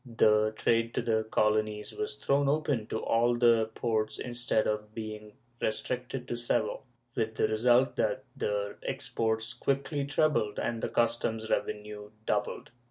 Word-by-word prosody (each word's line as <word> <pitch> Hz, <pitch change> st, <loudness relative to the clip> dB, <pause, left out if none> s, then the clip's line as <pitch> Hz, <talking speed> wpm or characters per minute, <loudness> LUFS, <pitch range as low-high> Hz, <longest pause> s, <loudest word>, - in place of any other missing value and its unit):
The 110 Hz, -1 st, +4 dB
trade 115 Hz, +1 st, +1 dB
to -, -, 0 dB
the 110 Hz, -1 st, +1 dB
colonies 105 Hz, -1 st, +1 dB
was 425 Hz, +1 st, -3 dB
thrown 140 Hz, -, +2 dB
open 145 Hz, -7 st, 0 dB
to -, -, -2 dB
all 120 Hz, +1 st, +3 dB
the 115 Hz, -2 st, +4 dB
ports 110 Hz, -2 st, 0 dB
instead 120 Hz, -2 st, 0 dB
of 105 Hz, 0 st, -2 dB
being 110 Hz, -1 st, -6 dB, 0.3 s
restricted 125 Hz, +3 st, -2 dB
to 120 Hz, -, -2 dB
Seville, 120 Hz, -2 st, 0 dB, 0.3 s
with 110 Hz, -2 st, -1 dB
the -, -, +2 dB
result 120 Hz, +4 st, +3 dB
that 130 Hz, +1 st, 0 dB
the 100 Hz, 0 st, -2 dB
exports 110 Hz, 0 st, -2 dB
quickly 140 Hz, +2 st, -1 dB
trebled 140 Hz, -8 st, +1 dB
and 115 Hz, -1 st, -2 dB
the -, -, -1 dB
customs 115 Hz, -1 st, 0 dB
revenue 105 Hz, 0 st, -2 dB, 0.2 s
doubled. -, -, -1 dB
115 Hz, 145 wpm, -30 LUFS, 110-125 Hz, 0.3 s, The